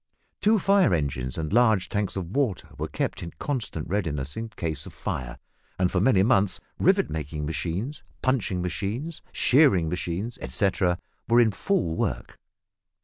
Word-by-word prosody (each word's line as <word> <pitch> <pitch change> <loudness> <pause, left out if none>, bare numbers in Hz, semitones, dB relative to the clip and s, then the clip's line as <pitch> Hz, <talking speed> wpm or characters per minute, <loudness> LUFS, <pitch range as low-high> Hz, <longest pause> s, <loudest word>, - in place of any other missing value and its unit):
Two 220 +2 +4
fire 195 - +4
engines 65 -4 -2
and 80 +1 -3
large 110 -5 +4
tanks 105 -3 -1
of 95 -1 -5
water 130 -10 0
were - - -3
kept - - -3
in 85 - -7
constant 110 - -3
readiness 75 -8 -2
in 115 0 -4
case 80 -8 -4
of - - -12
fire, 60 -1 -4 0.4
and 90 -1 +2
for 90 - +1
many 100 -4 +4
months 100 -4 +3 0.2
rivet - - +3
making 75 -1 -4
machines, 90 - -3 0.2
punching 110 -9 +1
machines, 105 - -3
shearing 110 - +4
machines, 90 +6 -3
etcetera, 90 +6 +1 0.3
were 120 +1 +5
in 115 -2 +5
full 130 - 0
work. - - -3
95 Hz, 150 wpm, -26 LUFS, 80-120 Hz, 0.4 s, were